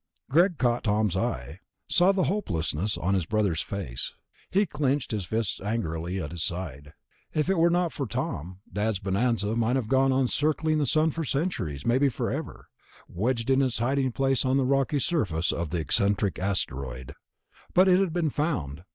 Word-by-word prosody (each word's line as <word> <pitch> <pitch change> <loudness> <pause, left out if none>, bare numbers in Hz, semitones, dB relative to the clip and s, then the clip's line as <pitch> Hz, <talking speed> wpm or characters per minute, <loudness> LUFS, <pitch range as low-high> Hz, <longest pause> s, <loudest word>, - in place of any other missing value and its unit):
Greg 170 +3 +4
caught 120 -2 +1
Tom's 105 -3 +1
eye, 95 -4 -2 0.3
saw 180 +2 +4
the 190 -2 +1
hopelessness 100 - -1
on 95 +3 0
his 95 -5 0
brother's 100 -6 +1
face. 95 -12 -4 0.3
He 200 +2 +3
clenched 140 -5 -1
his 105 -4 -2
fists 110 +3 -2
angrily 95 -4 -2
at 75 -5 -4
his 85 - -5
side. 75 -5 -5 0.4
If 155 +4 +2
it 195 - +1
were 170 +1 +5
not 175 -1 +1
for 140 - -3
Tom, 90 -2 -4
Dad's 105 0 0
bonanza 105 +2 0
might 115 +2 +1
have 125 -5 -1
gone 135 0 +4
on 130 -1 +2
circling 155 +3 +1
the 145 - +1
sun 155 +4 +3
for 165 +2 -3
centuries, 125 - -2
maybe 130 +4 +3
forever, 120 - -4 0.4
wedged 115 +6 -1
in 135 +1 +4
its 130 -3 +1
hiding 130 +3 +1
place 135 +1 +1
on 130 0 +2
the 135 - +2
rocky 135 +2 +2
surface 100 - 0
of 85 -2 -3
the 85 - -2
eccentric 100 +4 +1
asteroid. 65 -9 -3 0.6
But 185 +2 +6
it 185 0 +5
had 195 -3 +1
been 165 -3 0
found. 85 - -2
115 Hz, 175 wpm, -27 LUFS, 95-145 Hz, 0.6 s, But